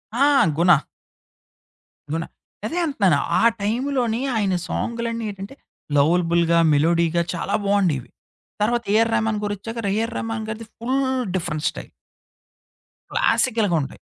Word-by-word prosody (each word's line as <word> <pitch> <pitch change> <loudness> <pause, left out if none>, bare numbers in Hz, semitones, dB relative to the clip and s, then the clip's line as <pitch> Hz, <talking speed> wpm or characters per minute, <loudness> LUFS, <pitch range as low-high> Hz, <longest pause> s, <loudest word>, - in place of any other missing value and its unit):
ఆ! - - -2 0.3
'గుణ...' 165 +1 +4 1.3
'గుణ.' 165 +1 -2 0.4
అదే 325 +10 -3
అంటన్నాను. 200 - +2 0.2
ఆ - - +2 0.2
టైంలోని 240 +2 0
ఆయన 200 -4 +1
సాంగ్లన్నీ 230 -1 -3
ఏంటంటే, 200 +5 -9 0.4
లవలబుల్‌గా, 170 +2 +3
మెలోడీగా 170 +3 +2
చాలా 180 +3 -2
బావుండెవి. 185 -10 +1 0.5
తర్వాత 235 +2 +1
'ఏఎర్ 225 +1 +3
రెహ్‌మాన్' 220 -1 0
గారొచ్చాక 210 +2 -4
'ఏఎర్ 230 +2 -2
రామాన్' 225 -1 -4
గారిది 220 +1 -6
ఫుల్ 260 +4 -1 0.3
డిఫరెన్ 155 -4 -2
స్టైల్. - - -9 1.2
క్లాసికల్‌గా 225 - +2
ఉంటాయి. 135 - -7
205 Hz, 110 wpm, -22 LUFS, 170-230 Hz, 1.3 s, గుణ